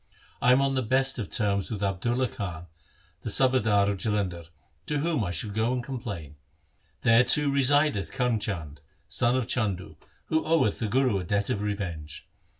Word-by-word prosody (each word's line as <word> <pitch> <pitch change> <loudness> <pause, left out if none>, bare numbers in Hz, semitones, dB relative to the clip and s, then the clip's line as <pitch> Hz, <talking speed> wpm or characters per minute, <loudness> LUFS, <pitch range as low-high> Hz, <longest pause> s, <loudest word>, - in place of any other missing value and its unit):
I 125 - +5
am 130 +2 +5
on 135 0 +1
the 130 - +1
best 130 +3 +1
of 105 - -4
terms 100 -4 0
with 105 -3 -4
Abdulla 120 +7 0
Khan, 90 -7 -6 0.6
the - - -4
subadar 110 -6 +3
of 100 -2 -1
Jalandhar, 95 -6 -2 0.4
to 150 -2 0
whom 150 -4 0
I 95 - -2
shall 90 +5 -1
go 110 +4 0
and 125 -1 -2
complain. 100 - -6 0.6
There 115 +2 +5
too 140 +3 +4
resideth 140 -5 +2
Karm 125 -4 0
Chand, 80 -9 -4 0.3
son 120 +2 +1
of 130 - -1
Chandu, 95 -10 -2 0.3
who 160 0 0
oweth 160 -10 +2
the 110 - -1
Guru 125 -2 +2
a - - -4
debt 100 +3 -1
of 100 - -1
revenge. 90 -8 -5
110 Hz, 175 wpm, -27 LUFS, 100-130 Hz, 0.6 s, I